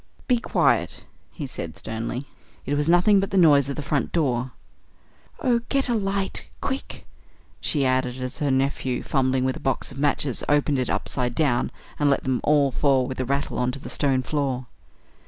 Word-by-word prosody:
"Be 245 Hz, -2 st, +3 dB
quiet!" -, -, +1 dB, 0.3 s
he 150 Hz, -, -6 dB
said 85 Hz, -10 st, -6 dB
sternly. 115 Hz, +4 st, -4 dB, 0.4 s
"It 140 Hz, -, -1 dB
was 145 Hz, +2 st, +1 dB
nothing 180 Hz, +4 st, +5 dB
but 195 Hz, -, -1 dB
the 195 Hz, -, 0 dB
noise 145 Hz, -6 st, +5 dB
of 140 Hz, -, -3 dB
the 150 Hz, -, -4 dB
front 140 Hz, 0 st, -1 dB
door." 130 Hz, -6 st, 0 dB, 0.9 s
"Oh! 240 Hz, -3 st, +2 dB
get 275 Hz, -1 st, +1 dB
a -, -, +2 dB
light 195 Hz, -2 st, -2 dB
quick!" 270 Hz, 0 st, -4 dB, 0.5 s
she 145 Hz, -3 st, 0 dB
added, 130 Hz, -1 st, +1 dB
as 130 Hz, 0 st, -5 dB
her 145 Hz, -, 0 dB
nephew, 130 Hz, -1 st, 0 dB
fumbling 130 Hz, -2 st, +1 dB
with 130 Hz, -, 0 dB
a -, -, -9 dB
box 135 Hz, +1 st, -2 dB
of 135 Hz, -, -9 dB
matches, 145 Hz, -3 st, 0 dB
opened 145 Hz, -1 st, +2 dB
it 125 Hz, -, -1 dB
upside 125 Hz, -2 st, -1 dB
down 135 Hz, -6 st, +2 dB, 0.3 s
and 145 Hz, -1 st, +3 dB
let 140 Hz, -, +2 dB
them 130 Hz, -1 st, 0 dB
all 145 Hz, -2 st, +3 dB
fall 130 Hz, +2 st, +2 dB
with 130 Hz, 0 st, -6 dB
a 130 Hz, -, 0 dB
rattle 140 Hz, +1 st, -1 dB
on 125 Hz, 0 st, +1 dB
to -, -, -6 dB
the 140 Hz, -, -8 dB
stone 135 Hz, -3 st, +1 dB
floor. 135 Hz, -3 st, -1 dB
140 Hz, 190 wpm, -24 LUFS, 130-150 Hz, 0.9 s, nothing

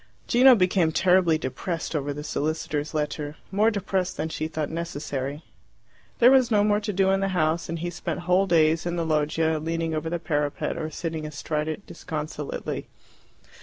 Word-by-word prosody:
Gino 255 Hz, +1 st, +7 dB
became 180 Hz, -4 st, +2 dB
terribly 180 Hz, -1 st, +4 dB
depressed 165 Hz, +4 st, -4 dB
over 145 Hz, -1 st, -1 dB
the 145 Hz, +1 st, -5 dB
solicitors' 155 Hz, 0 st, -2 dB
letter, 150 Hz, 0 st, -2 dB, 0.2 s
more 210 Hz, +3 st, +4 dB
depressed 190 Hz, -3 st, -2 dB
than 155 Hz, +2 st, -2 dB
she 155 Hz, 0 st, -3 dB
thought 155 Hz, -2 st, -3 dB
necessary. 145 Hz, -3 st, -4 dB, 0.7 s
There 245 Hz, +2 st, +7 dB
was 260 Hz, -3 st, +5 dB
no 210 Hz, -3 st, +4 dB
more 210 Hz, 0 st, +3 dB
to 210 Hz, 0 st, -3 dB
do 190 Hz, 0 st, +2 dB
in 195 Hz, -, +2 dB
the 195 Hz, -, 0 dB
house, 160 Hz, +1 st, +1 dB
and 170 Hz, -, -2 dB
he 175 Hz, +2 st, -3 dB
spent 180 Hz, -, -4 dB
whole 180 Hz, +2 st, +2 dB
days 165 Hz, -1 st, +3 dB
in 175 Hz, -, -1 dB
the 170 Hz, -1 st, -1 dB
loggia 155 Hz, +1 st, +1 dB
leaning 165 Hz, +1 st, -2 dB
over 155 Hz, +1 st, -2 dB
the 175 Hz, -, -1 dB
parapet 145 Hz, -3 st, -1 dB
or 155 Hz, -1 st, -3 dB
sitting 160 Hz, 0 st, -4 dB
astride 150 Hz, 0 st, -3 dB
it 160 Hz, +6 st, -5 dB
disconsolately. 150 Hz, -2 st, -5 dB
160 Hz, 175 wpm, -25 LUFS, 155-185 Hz, 0.7 s, Gino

